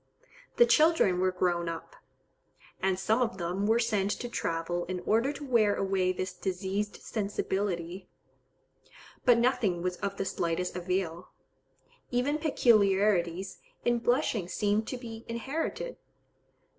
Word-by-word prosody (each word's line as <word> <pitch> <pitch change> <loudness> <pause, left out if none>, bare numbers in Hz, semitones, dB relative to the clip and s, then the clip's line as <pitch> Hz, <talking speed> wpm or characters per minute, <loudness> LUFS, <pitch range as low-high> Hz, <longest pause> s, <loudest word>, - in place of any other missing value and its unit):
The 480 - +7
children 310 - +4
were 185 0 +2
grown 175 -2 0
up; 165 - -7 0.9
"and 190 -1 +1
some 220 +6 +1
of 225 -6 0
them 180 +3 -1
were 225 +1 +4
sent 210 -4 +1
to 245 - -3
travel 170 -3 -2
in 185 0 -3
order 230 +8 +2
to 290 0 -8
wear 225 -6 +3
away 190 -1 +1
this 185 0 -4
diseased 190 +3 -3
sensibility, 190 -4 -3 1.2
but 245 -2 +6
nothing 235 -8 +1
was 180 0 -1
of 200 0 -3
the 195 - -2
slightest 175 0 -2
avail." 180 -1 -2 0.8
Even 265 +5 0
peculiarities 195 - +2 0.3
in 240 0 +2
blushing 235 -5 +1
seem 205 +3 +1
to 255 - -4
be 230 -2 -8
inherited. 275 - -3
195 Hz, 130 wpm, -29 LUFS, 180-235 Hz, 1.2 s, The